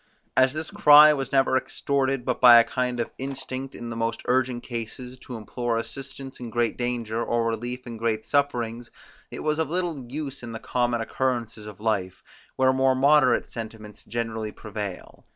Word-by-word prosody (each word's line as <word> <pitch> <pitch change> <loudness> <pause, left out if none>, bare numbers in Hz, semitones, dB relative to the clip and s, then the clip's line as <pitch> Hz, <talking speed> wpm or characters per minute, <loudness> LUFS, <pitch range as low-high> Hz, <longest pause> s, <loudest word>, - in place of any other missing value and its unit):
As 130 +1 +4
this 155 +1 -5
cry 150 -7 +8
was 135 -2 -4
never 135 -1 +3
extorted 135 -1 -1
but 125 - -1
by 120 -2 +10
a - - +6
kind 125 0 -2
of 120 - -2
instinct 135 0 -5
in 120 0 -7
the - - -5
most 115 0 -2
urgent 125 -1 +1
cases, 125 +2 -7
to 125 - -9
implore 115 +1 -3
assistance 135 +3 -7
in 120 -2 -6
great 120 0 0
danger, 120 -2 -2
or 120 -1 0
relief 120 +3 -3
in 120 -2 -7
great 110 -1 -1
sufferings, 120 -5 -1 0.4
it - - -7
was 155 0 0
of 160 -3 0
little 165 -8 -3
use 140 -1 -5
in 120 -1 -7
the 115 - -5
common 120 -1 0
occurrences 115 -3 -2
of 105 - -10
life, 95 -4 -2 0.3
where 130 0 +3
more 130 0 +3
moderate 140 +2 +4
sentiments 110 -2 -9
generally 110 -2 -3
prevail. 105 -4 -7
120 Hz, 175 wpm, -25 LUFS, 115-135 Hz, 0.4 s, by